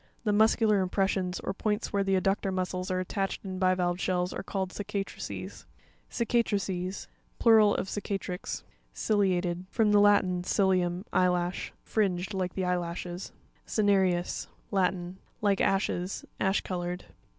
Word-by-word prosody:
The 210 -3 +1
"muscular 215 0 +4
impressions" 185 -1 0
or 190 - -3
points 210 +1 -2
where 200 -1 +2
the 195 -1 +2
adductor 195 +1 0
muscles 185 0 -2
are 185 0 0
attached 195 +2 -2
in 185 -1 -4
bivalve 185 -1 +2
shells 180 -1 0
are - - -4
called 190 -1 -3
cicatrices. 200 -1 -5 0.4
Cica'trices.—Plural 210 -1 +1
of - - -2
cicatrix. 195 -3 -4 0.3
Ci'u1atED.—From 190 +1 +1
the 205 - +6
Latin, 200 -3 +4
cilium, 185 -1 +1
eyelash. 180 0 +1
Fringed, 195 -2 0
like 185 -2 -2
the 190 - -1
eye 180 0 +2
lashes. 175 +1 -5 0.4
Cine'rEvs.—Latin. 190 -2 0 0.2
Like 200 -2 +2
ashes; 190 -1 0
ash 190 +1 +2
colored. 180 -1 -4
190 Hz, 120 wpm, -29 LUFS, 180-205 Hz, 0.4 s, the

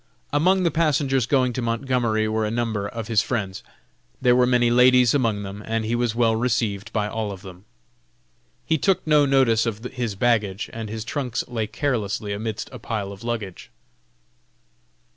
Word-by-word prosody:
Among 185 +5 +3
the 170 - +2
passengers 140 -6 +1
going 130 -2 +2
to 125 - -3
Montgomery 115 -2 0
were 110 0 0
a 105 - 0
number 110 -3 -2
of 110 +1 -6
his 115 -3 +3
friends. 100 -6 -3 0.6
There 125 -1 +4
were 125 0 +4
many 120 -1 +3
ladies 125 0 +5
among 115 -7 +1
them, 100 +1 -7
and 115 0 -2
he 115 - -1
was 120 -2 0
well 115 -2 +3
received 115 -3 -1
by 105 -2 0
all 110 -1 -3
of 95 0 -9
them. 95 0 -12 1.0
He 160 - +1
took 190 +1 +1
no 150 -2 +4
notice 125 -4 +3
of 110 0 -4
his 120 -5 -3
baggage, 105 -3 0
and 115 -2 -5
his 110 0 -5
trunks 135 -3 -2
lay 115 -3 -2
carelessly 110 -5 -2
amidst 110 +1 -4
a - - -8
pile 105 -4 -4
of 100 +3 -11
luggage. 110 -6 -5
115 Hz, 175 wpm, -23 LUFS, 105-125 Hz, 1.0 s, ladies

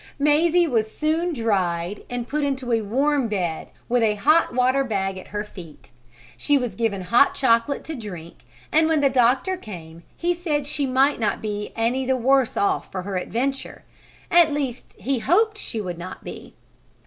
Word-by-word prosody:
Mazie 315 +4 +3
was 225 -7 0
soon 320 +3 0
dried 195 - -1
and 245 -1 -4
put 300 +3 -1
into 265 -3 -2
a 225 -1 +2
warm 270 +5 +1
bed, 180 -7 -2 0.2
with 245 0 +2
a 215 -2 +2
hot 305 +10 +3
water 255 +2 +2
bag 195 -6 -2
at - - -12
her 205 +1 -4
feet. 170 -7 -13 0.4
She 290 -1 +2
was 245 -6 -2
given 200 -2 -1
hot 235 +9 +4
chocolate 235 +2 +2
to 320 - -6
drink 185 - -8 0.3
and 315 +1 +4
when 320 -2 +2
the 275 -1 +3
doctor 260 +9 +2
came 170 - -10 0.2
he 350 +1 +1
said 310 -5 -2
she 285 -1 -1
might 265 +2 +2
not 220 - 0
be 210 -1 -4
any 235 +4 0
the 260 0 +1
worse 265 0 +2
off 200 - 0
for 185 -1 -4
her 195 0 -4
adventure; 255 +9 -3 0.5
at 335 -2 +6
least 275 -4 -4
he 270 -1 -1
hoped 425 - +2
she 225 - -4
would 180 -4 -5
not 180 +2 -8
be. - - -10
250 Hz, 180 wpm, -23 LUFS, 210-290 Hz, 0.5 s, at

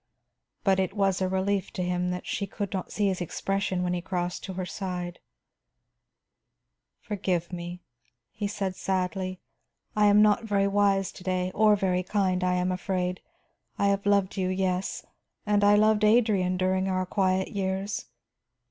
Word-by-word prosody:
But 190 -1 +3
it 190 +1 -1
was 195 -2 +1
a 185 - +1
relief 190 +1 0
to 180 - -2
him 180 0 0
that 180 0 -4
she 200 - -2
could 200 -1 -4
not 190 -2 -4
see 210 - 0
his 190 -2 0
expression 190 +1 -1
when 180 0 0
he 175 - -2
crossed 180 -1 -3
to 190 - -5
her 185 0 -3
side. 180 -1 -5 1.8
"Forgive 185 -4 -2
me," 175 0 -6 0.5
he 205 - -3
said 195 -2 -3
sadly. 185 0 -2 0.5
"I 210 0 +5
am 205 +1 +6
not 210 +2 +3
very 200 -2 +1
wise 200 -1 +2
to - - -13
day, 185 0 -1
or 215 0 +5
very 185 -2 +1
kind, 185 -1 0
I 180 0 +2
am 180 0 0
afraid. 180 0 -2 0.6
I 200 - +2
have 200 0 0
loved 200 -1 +2
you; 185 -1 0
yes, 185 0 -1 0.4
and 205 -1 +2
I 205 0 +6
loved 215 0 +4
Adrian 210 -5 +3
during 185 +1 +1
our 185 -1 0
quiet 190 0 +1
years. 195 +1 -2
190 Hz, 165 wpm, -27 LUFS, 180-200 Hz, 1.8 s, am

